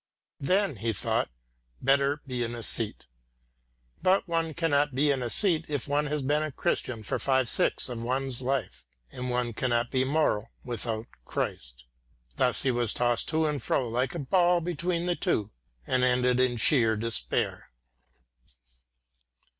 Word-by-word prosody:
"Then," 185 - +1
he 115 +3 -1
thought, 95 - 0 0.5
"better 140 +2 +2
be 125 -3 -2
an 120 0 -3
æsthete." 115 -2 0 1.0
But 190 +1 +3
one 165 -2 -1
cannot 145 -4 +1
be 145 +2 +3
an 135 - 0
æsthete 160 - +1
if 145 -3 -3
one 145 +1 +1
has 150 -1 -2
been 145 +3 +1
a 155 -1 -2
Christian 120 -3 -2
for - - -2
five 130 -2 +2
sixths - - +2
of 120 -2 -5
one's 130 +1 -1
life, 130 - -2 0.3
and 125 0 -5
one 125 -1 -1
cannot 120 0 0
be 130 -1 +2
moral 130 -6 +1
without 115 -2 -3 0.2
Christ. - - -4 0.5
Thus 125 -1 +2
he 130 - +2
was 120 -3 0
tossed 120 -1 +1
to 160 0 +1
and 150 -3 -1
fro 125 +2 0
like 125 +5 -1
a 150 -5 -4
ball 175 +2 +4
between 170 +1 -2
the 175 -1 +1
two, 140 - -1 0.3
and 130 0 +1
ended 125 0 +3
in 125 -1 +2
sheer 115 -2 +3
despair. 110 - -1
130 Hz, 155 wpm, -28 LUFS, 120-150 Hz, 1.0 s, ball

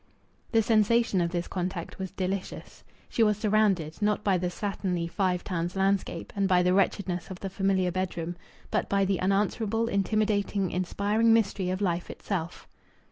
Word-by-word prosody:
The 225 -2 +4
sensation 225 -2 +3
of 170 - +1
this 175 0 -3
contact 180 -1 -4
was 190 -1 -3
delicious. 190 +2 -5 0.2
She - - -1
was 210 -2 +4
surrounded, 210 -6 +1
not 210 0 +1
by 190 -3 +2
the 180 - -1
slatternly 180 -2 -2
Five 180 0 0
Towns 175 -1 -3
landscape 195 -3 0
and 200 -1 +1
by 180 -2 +4
the 180 0 +3
wretchedness 185 -3 0
of 185 -1 -7
the 195 - -4
familiar 190 -2 +1
bedroom, 175 -2 -3 0.4
but - - 0
by 200 -1 +2
the 190 -1 0
unanswerable, 210 +4 +1
intimidating, 200 -2 0
inspiring 205 +5 +1
mystery 200 -4 +1
of 185 +2 -2
life 175 -3 -1
itself. 175 -4 -5
195 Hz, 160 wpm, -28 LUFS, 180-205 Hz, 0.4 s, The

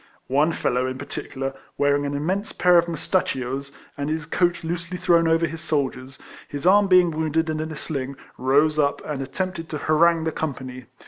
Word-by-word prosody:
One 150 +4 +4
fellow, 125 -5 0
in 130 0 -4
particular, 135 -1 -5 0.2
wearing 145 0 +2
an 140 - -3
immense 185 +9 -2
pair 180 -1 +5
of 170 - 0
mustachios, 140 -5 -2 0.2
and 145 +1 -3
his 160 0 -2
coat 170 +1 0
loosely 170 +2 -4
thrown 170 -2 +3
over 165 +1 +3
his 165 +1 -6
shoulders, 135 -4 -2 0.3
his 145 +1 -6
arm 200 +2 +6
being 180 -2 +5
wounded, 160 +1 0
and 155 0 -2
in 155 - -4
a 160 - -6
sling, 140 -3 -4 0.2
rose 145 +4 +2
up, 140 -1 +1
and 145 -3 -3
attempted 165 +4 -4
to 155 - -3
harangue 160 +2 +3
the 160 - -1
company. 130 -5 -5
155 Hz, 185 wpm, -23 LUFS, 140-170 Hz, 0.3 s, arm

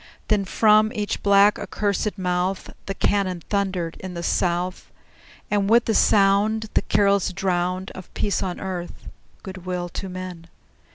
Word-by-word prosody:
Then 205 -2 +2
from 215 +2 +4
each 205 -1 -2
black, 200 +1 +5
accursed 205 0 -2
mouth 180 +1 -1 0.2
The 195 - -3
cannon 185 -5 0
thundered 190 -5 -1
in 185 -1 -7
the 170 - -5
South, 180 +1 -1 0.6
And 205 -1 +1
with 235 +1 +5
the 225 - +1
sound 210 +2 +3
The - - +3
carols 200 -2 +2
drowned 185 0 -1
Of 185 - -11
peace 205 - 0
on 185 -2 -3
earth, 180 -2 -6 0.4
good 185 -2 -9
will 180 -1 -3
to 190 +3 -6
men! 180 -2 -7
190 Hz, 150 wpm, -23 LUFS, 180-205 Hz, 0.6 s, black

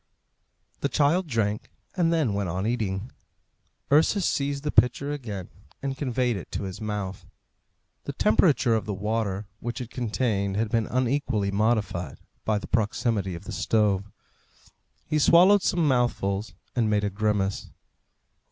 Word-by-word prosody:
The - - -1
child 165 +5 +2
drank, 105 -5 -1 0.3
and 170 -3 +2
then 155 -10 +1
went 100 -2 -1
on 95 +4 -2
eating. 110 -2 -2 0.8
Ursus 160 +6 +4
seized 140 0 -1
the 150 - -1
pitcher 140 +3 +3
again, 110 -10 -5 0.3
and 135 -1 -2
conveyed 125 -4 0
it 90 - -9
to - - -2
his 95 +1 -6
mouth. 105 -3 -4 0.8
The - - -4
temperature 125 - +3
of 110 -3 0
the 105 - -2
water 105 0 -2
which 120 +2 -4
it 120 -2 -7
contained 105 -5 -1
had 110 0 0
been 115 -3 +1
unequally 125 -5 0
modified 100 - 0 0.3
by 110 -1 +2
the 105 - -5
proximity 105 -3 0
of 85 - -9
the - - -8
stove. 105 -2 +1 1.0
He 155 0 0
swallowed 185 +7 +6
some 170 -4 +1
mouthfuls 115 -6 0 0.2
and 115 -3 +2
made 105 -1 +1
a 100 - 0
grimace. 100 -1 -1
110 Hz, 145 wpm, -26 LUFS, 100-135 Hz, 1.0 s, swallowed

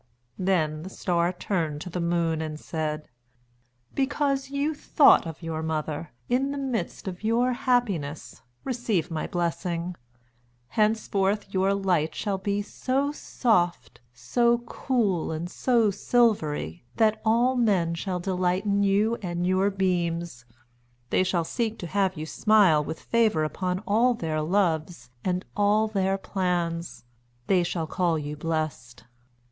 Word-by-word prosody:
Then 160 -5 +1
the 185 - -7
Star 175 -2 0
turned 170 -5 -2
to 180 - -6
the 180 - -3
Moon 170 -2 0
and 155 -1 -5
said: 155 -2 -3 0.9
"Because 275 0 0
you 285 +3 0
thought 290 - +5
of 165 +1 -8
your 160 -1 -3
mother, 155 0 -3 0.2
in 265 +3 +1
the 285 - -3
midst 250 -10 -3
of 180 +1 -6
your 240 +3 +2
happiness, 235 - -1 0.2
receive 230 - -1
my 160 - -2
blessing. 175 0 -2 0.7
Henceforth 210 -2 0
your 190 +1 +2
light 175 -6 0
shall 200 -3 -2
be 200 +1 -1
so 270 +6 -1
soft, 175 - 0
so 235 - +2
cool, 220 - 0
and 160 +2 -3
so 235 -5 +2
silvery, 195 - +1
that 220 -1 +2
all 235 +4 +3
men 195 -9 +2
shall 180 +2 -3
delight 185 +1 0
in 200 -1 +2
you 205 +4 +2
and 175 -2 -2
your 185 +2 +2
beams. 170 -8 -1 0.7
They - - +3
shall 180 -2 0
seek 225 +5 -2
to 175 - -6
have 190 0 0
you 155 - -4
smile 190 -4 +4
with 160 - -5
favour 220 -9 +2
upon 180 +4 -2
all 230 +5 +3
their 160 -6 -2
loves 170 -4 0
and 180 0 -1
all 210 +1 +3
their 195 -2 0
plans. 175 -5 -2 0.4
They 185 +3 +3
shall 170 -1 -2
call 170 0 0
you 150 0 -4
blessed." 155 -6 -3
185 Hz, 140 wpm, -26 LUFS, 165-215 Hz, 0.9 s, thought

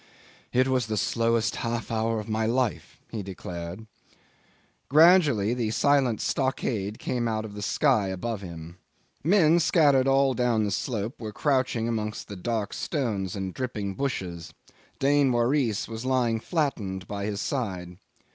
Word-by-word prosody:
"It 130 +1 +3
was 130 -3 +1
the 110 -1 -2
slowest 115 +1 +1
half 115 0 -3
hour 115 0 0
in 105 +1 -7
my 110 0 0
life," 125 -1 -1
he 110 - -3
declared. 90 +1 -7 1.0
Gradually 150 - +5
the 120 -3 -1
silent 130 -2 +2
stockade 115 -6 -1
came 120 -2 -2
out 110 -1 -1
on 105 - -8
the 105 - -7
sky 110 -1 +2
above 100 +3 -3
him. 85 -2 -9 0.5
Men 170 -1 +5
scattered 145 -5 +4
all 135 0 +4
down 120 -2 +1
the 105 - -1
slope 115 +3 -3
were 110 -1 -4
crouching 130 -3 0
amongst 110 -2 -3
the 100 - -6
dark 105 +2 -2
stones 105 - -2
and 95 -2 -4
dripping 105 -6 -3
bushes. 95 -9 -4 0.4
Dain 140 -1 +3
Waris 120 -2 +1
was 115 +1 -6
lying 125 -3 +1
flattened 110 - -2
by 100 -1 -4
his 105 -1 -3
side. 90 -10 -3
115 Hz, 145 wpm, -26 LUFS, 100-130 Hz, 1.0 s, Gradually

